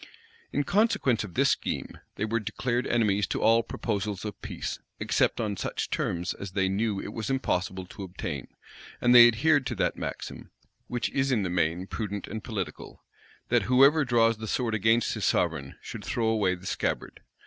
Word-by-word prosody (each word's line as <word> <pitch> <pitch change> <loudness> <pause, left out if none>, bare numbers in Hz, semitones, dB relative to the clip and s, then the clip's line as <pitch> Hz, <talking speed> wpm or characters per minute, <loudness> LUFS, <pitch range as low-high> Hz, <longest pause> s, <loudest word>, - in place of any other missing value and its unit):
In 145 - 0
consequence 195 - +2
of 90 -5 -9
this - - +4
scheme, - - -3 0.2
they 105 - -1
were 115 +1 0
declared 120 +3 -2
enemies 105 -4 +2
to - - -2
all 115 +1 +5
proposals 105 -3 -3
of 105 - -6
peace, - - -5 0.2
except - - +1
on 105 -3 -1
such - - -3
terms 85 +1 -1
as 100 -2 -8
they 95 -1 +1
knew 100 +1 0
it 105 - -6
was 110 -2 -4
impossible 95 -8 -1
to 95 - -11
obtain; 85 -7 -5 0.5
and 120 - +4
they 120 -1 +11
adhered 135 +4 +3
to - - -3
that - - 0
maxim, - - -6 0.4
which 120 -1 -2
is 135 0 +1
in 110 -6 +2
the 90 - -2
main 85 +1 0
prudent 105 0 -4
and 110 +1 -6
political, 105 -6 -6 0.5
that - - +4
whoever 140 +5 +6
draws 115 -3 +3
the 110 0 -6
sword 115 0 -1
against 110 +2 +2
his - - -4
sovereign, 70 0 0
should - - -7
throw 115 -2 0
away 105 -5 +2
the 90 +1 -14
scabbard. - - -2
110 Hz, 180 wpm, -28 LUFS, 95-120 Hz, 0.5 s, they